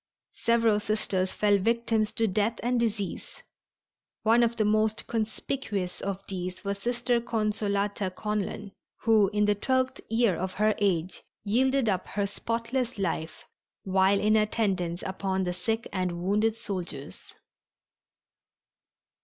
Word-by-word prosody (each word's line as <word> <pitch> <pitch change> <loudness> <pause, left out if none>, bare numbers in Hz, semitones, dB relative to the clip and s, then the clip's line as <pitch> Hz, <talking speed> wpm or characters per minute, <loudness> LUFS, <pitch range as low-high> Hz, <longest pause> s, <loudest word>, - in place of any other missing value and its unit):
Several 230 -2 +3
Sisters 205 -3 -1
fell 205 -1 +3
victims 225 0 +1
to 225 - +1
death 215 +3 0
and 245 0 +1
disease. 215 -4 -3 0.8
One 230 +2 +5
of 235 0 +2
the 215 - +1
most 215 +1 +2
conspicuous 215 -3 -3
of 195 0 -4
these 185 -1 -5
was 200 0 -2
Sister 240 +1 0
Consolata 210 -3 -1
Conlan, 210 +1 -3 0.3
who 220 -3 +5
in 210 0 +2
the 210 - +4
twentieth 260 +5 0
year 225 -4 +3
of 185 +2 -4
her 215 +1 +3
age 185 -3 0 0.2
yielded 260 +4 +2
up 190 -3 0
her 200 0 -1
spotless 230 +4 -2
life 165 -4 -3 0.4
while 190 +1 +3
in 215 +1 +3
attendance 195 -5 0
upon 190 0 -1
the 180 -1 -1
sick 220 +6 -2
and 185 -2 -1
wounded 210 +4 +2
soldiers. 185 -10 -6
210 Hz, 130 wpm, -28 LUFS, 195-230 Hz, 0.8 s, One